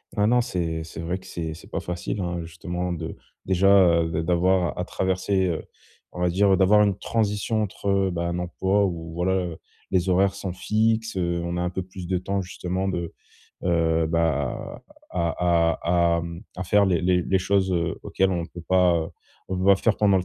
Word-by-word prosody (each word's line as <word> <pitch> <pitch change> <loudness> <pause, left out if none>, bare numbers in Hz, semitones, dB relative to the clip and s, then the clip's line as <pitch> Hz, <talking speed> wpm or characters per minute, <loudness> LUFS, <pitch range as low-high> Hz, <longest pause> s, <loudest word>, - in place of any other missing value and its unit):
Ben 105 +1 +2
non, 125 +1 +4
c'est 80 -6 -2
c'est 80 - -9
vrai 85 +3 -2
que 95 - -15
c'est 80 -3 -5
c'est - - -14
pas - - -2
facile 90 +3 -4
hein 85 -1 -2
justement 90 +2 -4
de, 80 -1 -5 0.3
déjà, 95 -2 +5
heu, 80 - -2
d 80 - -1
d'avoir 90 +1 +2
à 90 - -2
traverser, 95 0 0
heu 85 -3 -2 0.5
on - - -9
va 90 - +3
dire 95 +2 +4
d'avoir 105 +2 +5
une 100 -2 +2
transition 110 0 0
entre, 100 0 -6
heu, 95 -1 +2
bah, 85 0 -2
un 85 0 -2
emploi 95 +3 +1
ou 85 -3 -4
voilà, 90 -1 -1 0.3
les 95 0 +1
horaires 95 +2 +3
sont 95 -3 -4
fixes, 110 +2 0
heu, 85 -1 0
on 85 0 -3
a - - -1
un 90 +1 -1
peu 95 - -3
plus 90 -1 -9
de 90 0 0
temps, 95 +2 -2
justement 90 +2 -3
de, 85 -3 -2 0.5
heu, 80 -2 +2
bah, 80 -5 -1 0.3
à 85 -1 +1 0.2
à 85 -1 +3
à, - - 0
hem, 85 +1 -7
à 90 - -3
faire 100 +2 +4
les 90 -2 +1
les 90 0 +3
les 95 +2 +1
choses, 95 0 +1
heu, 85 -2 -1
auxquelles 95 0 +1
on 85 -2 -2
peut 85 - -10
pas, 90 -2 +4
heu, 80 0 -2 0.4
on 95 -1 -2
peut 95 - -1
pas 100 -1 +7
faire 110 +1 +1
pendant 100 -2 +4
le 90 - 0
90 Hz, 210 wpm, -24 LUFS, 85-95 Hz, 0.5 s, pas